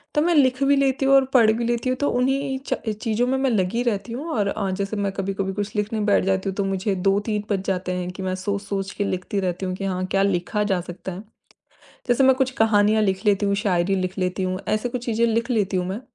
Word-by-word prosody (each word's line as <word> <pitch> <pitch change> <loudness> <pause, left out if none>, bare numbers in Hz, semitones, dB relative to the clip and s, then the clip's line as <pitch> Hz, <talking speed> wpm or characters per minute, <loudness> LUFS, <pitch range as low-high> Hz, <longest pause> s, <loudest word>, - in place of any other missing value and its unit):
तो 295 - +4
मैं 345 +2 +2
लिख 260 -3 +3
भी 280 +1 +4
लेती 270 -1 +1
हूँ 270 - +4
और 270 -1 +5
पढ़ 230 -4 +6
भी 230 +2 -1
लेती 240 +1 -1
हूँ 255 - 0
तो 285 - +2
उन्ही 270 +2 0
च - - +1 0.3
चीज़ों 230 0 +1
में 265 +1 +1
मैं 265 -1 +1
लगी 210 +2 0
रहती 230 -1 -2
हूँ। 270 +6 -5
और 205 -6 0
अ, 200 -2 -2
जैसे 200 +2 -3
मैं 200 -1 -1
कभी-कभी 195 0 -2
कुछ 205 +2 -4
लिखने 215 +1 -1
बैठ - - +4
जाती 190 0 0
हूँ 190 - -5
तो 200 - +1
मुझे 195 +1 -1
2-3 205 +1 0
बज 195 -2 +1
जाते 185 -1 -1
हैं 180 0 -3
कि 190 +1 -7
मैं 185 0 -1
सोच-सोच 200 -1 -2
के 205 - 0
लिखती 185 +1 -2
रहती 180 0 -2
हूँ 185 0 -2
कि 195 - -5
हाँ, 185 -1 -1
क्या 195 0 +1
लिखा 200 +2 0
जा 180 - 0
सकता 180 +2 -7
है। 185 +2 -7 0.9
जैसे 245 +2 +3
मैं 265 0 +6
कुछ 260 0 0
कहानियाँ 215 0 +4
लिख 190 -1 -1
लेती 205 0 +3
हूँ, 200 0 +1
शायरी 195 -2 +1
लिख 185 0 -3
लेती 185 +1 -1
हूँ, 185 0 -2
ऐसी 215 +3 0
कुछ 245 0 -5
चीज़ें 230 0 +1
लिख 230 +2 0
लेती 200 -5 +1
हूँ 180 - -1
मैं। 195 +5 -4
205 Hz, 255 wpm, -23 LUFS, 190-240 Hz, 0.9 s, पढ़